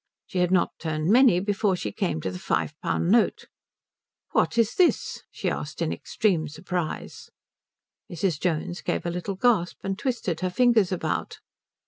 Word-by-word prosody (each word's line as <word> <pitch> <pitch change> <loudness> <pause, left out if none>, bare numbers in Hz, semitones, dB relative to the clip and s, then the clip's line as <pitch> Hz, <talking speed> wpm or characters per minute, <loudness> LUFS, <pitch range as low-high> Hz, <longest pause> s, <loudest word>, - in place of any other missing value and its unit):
She 185 - -3
had 180 -1 +3
not 185 -1 +2
turned 160 +2 -1
many 245 -6 +6
before 200 0 +1
she 105 - -4
came 80 -5 -2
to 95 - -3
the 90 - -7
five 150 - -1
pound 170 - 0
note. 230 0 +3 0.9
"What - - +1
is 230 0 +3
this?" 360 -2 +2
she - - -5
asked, - - -3
in - - 0
extreme 180 -8 0
surprise. 175 +2 -5 0.8
Mrs. 175 -2 -1
Jones 175 +2 -2
gave - - -2
a 170 - -1
little 180 +3 -4
gasp, 195 -5 +2
and 195 +1 -3
twisted 235 - -2
her 185 - -1
fingers 225 -1 +3
about. 185 - -2
185 Hz, 160 wpm, -26 LUFS, 170-210 Hz, 0.9 s, many